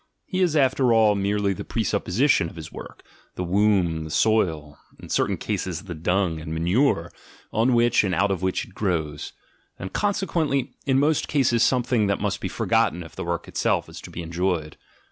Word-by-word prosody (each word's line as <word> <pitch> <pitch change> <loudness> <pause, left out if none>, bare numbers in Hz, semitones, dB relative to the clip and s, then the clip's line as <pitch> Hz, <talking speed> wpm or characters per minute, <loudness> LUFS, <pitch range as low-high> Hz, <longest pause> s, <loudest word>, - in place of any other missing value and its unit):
He 185 -2 -2
is 175 -4 +2
after 130 -3 +3
all 110 -2 +5
merely 100 0 0
the - - -6
presupposition 110 - +1
of - - -15
his 80 -2 -9
work, - - -10 0.3
the 90 - -3
womb, 90 -3 +2
the 80 - -7
soil, 80 -5 +1 0.2
in - - -11
certain - - +1
cases 90 -1 -3
the 95 -4 -7
dung 85 +1 0
and 80 0 -7
manure, 85 - +1 0.4
on 120 +3 +3
which 120 -1 +4
and 95 -3 0
out 100 +3 +2
of 95 - -2
which 95 0 -1
it 110 - -18
grows 80 -7 -2 0.2
— - - -41
and 95 - -7
consequently, 165 -9 0
in 135 -1 +3
most 145 +2 +2
cases, 125 -5 +2
something 125 -4 +2
that 100 - 0
must - - -2
be - - -2
forgotten 90 +1 +1
if 80 - -13
the - - -5
work 85 0 -3
itself - - 0
is - - -10
to - - -10
be 85 - -6
enjoyed. 85 -2 -2
100 Hz, 190 wpm, -24 LUFS, 85-120 Hz, 0.4 s, all